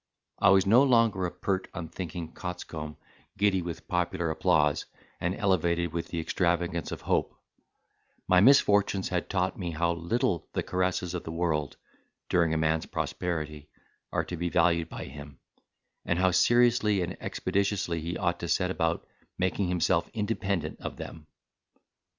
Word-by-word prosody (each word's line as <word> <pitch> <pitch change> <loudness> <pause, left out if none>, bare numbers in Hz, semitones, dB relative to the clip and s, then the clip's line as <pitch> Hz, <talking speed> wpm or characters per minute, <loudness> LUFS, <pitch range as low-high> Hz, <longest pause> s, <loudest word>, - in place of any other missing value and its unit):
I - - +5
was 95 0 +5
no 115 +6 +6
longer 115 -8 +3
a - - -6
pert 95 -1 -2
unthinking 85 0 -6
coxcomb, 80 -4 -6 0.4
giddy 100 -2 +2
with 85 -2 -7
popular 85 -2 0
applause, 75 -2 +2 0.3
and 90 +2 -1
elevated 85 -4 +1
with 85 -1 -3
the 85 - -4
extravagance 85 0 0
of - - -5
hope: - - 0 0.9
my 90 - +5
misfortunes 100 -5 +4
had 90 -2 -2
taught 95 0 -1
me 90 -2 -3
how 85 +1 0
little 85 +1 -1
the - - -1
caresses 90 -1 -1
of 90 - -4
the 80 - -6
world, 80 -4 -1 0.5
during 85 -2 +3
a 80 - +1
man's 80 0 +1
prosperity, 75 -4 -3 0.4
are - - 0
to 90 - -5
be 85 +1 -2
valued 85 -1 +2
by - - -6
him; 70 0 -10 0.7
and 85 - 0
how 90 0 +3
seriously 110 0 +4
and 90 +2 -4
expeditiously 100 -4 -1
he 85 +2 -3
ought 85 -1 0
to 85 - -4
set 90 +2 +1
about 85 -2 -1 0.3
making 95 +1 0
himself 90 -1 +1
independent 105 -4 -2
of - - -6
them. 75 -1 -9
90 Hz, 150 wpm, -28 LUFS, 85-95 Hz, 0.9 s, no